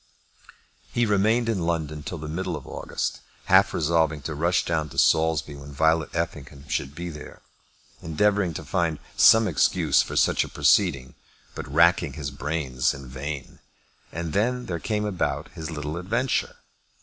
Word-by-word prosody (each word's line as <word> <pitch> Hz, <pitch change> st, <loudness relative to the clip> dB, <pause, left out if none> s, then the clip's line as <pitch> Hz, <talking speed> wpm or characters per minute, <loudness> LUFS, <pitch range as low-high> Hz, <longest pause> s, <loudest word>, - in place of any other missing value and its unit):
He 120 Hz, -, +1 dB
remained 110 Hz, +3 st, +2 dB
in 110 Hz, -4 st, 0 dB
London 75 Hz, -3 st, -2 dB
till 85 Hz, -, -6 dB
the 75 Hz, 0 st, -7 dB
middle 85 Hz, +5 st, -3 dB
of -, -, -8 dB
August, -, -, -4 dB, 0.3 s
half -, -, +5 dB
resolving 80 Hz, -2 st, +1 dB
to 80 Hz, -, -4 dB
rush 85 Hz, +4 st, +1 dB
down 80 Hz, -2 st, -1 dB
to -, -, -12 dB
Saulsby 80 Hz, -2 st, +2 dB
when 70 Hz, 0 st, -10 dB
Violet 80 Hz, +2 st, +2 dB
Effingham 75 Hz, -4 st, -4 dB
should 70 Hz, +1 st, -3 dB
be 85 Hz, +2 st, -5 dB
there, 75 Hz, -2 st, -11 dB, 0.6 s
endeavouring 95 Hz, +1 st, +1 dB
to -, -, -6 dB
find 85 Hz, -3 st, 0 dB, 0.2 s
some 110 Hz, -1 st, +6 dB
excuse 80 Hz, -8 st, +3 dB
for -, -, -5 dB
such -, -, +3 dB
a -, -, -8 dB
proceeding, 65 Hz, -2 st, +2 dB, 0.4 s
but -, -, -7 dB
racking 85 Hz, -1 st, +4 dB
his 75 Hz, -3 st, -5 dB
brains 70 Hz, -2 st, -1 dB
in 65 Hz, -1 st, -10 dB
vain, 70 Hz, +2 st, -6 dB, 0.5 s
and 85 Hz, -1 st, -5 dB
then 125 Hz, +5 st, 0 dB
there 85 Hz, -2 st, -4 dB
came 105 Hz, +3 st, -2 dB
about 100 Hz, -5 st, -2 dB
his 80 Hz, 0 st, -7 dB
little 75 Hz, -1 st, -4 dB
adventure. 115 Hz, +9 st, -1 dB
80 Hz, 160 wpm, -25 LUFS, 75-90 Hz, 0.6 s, some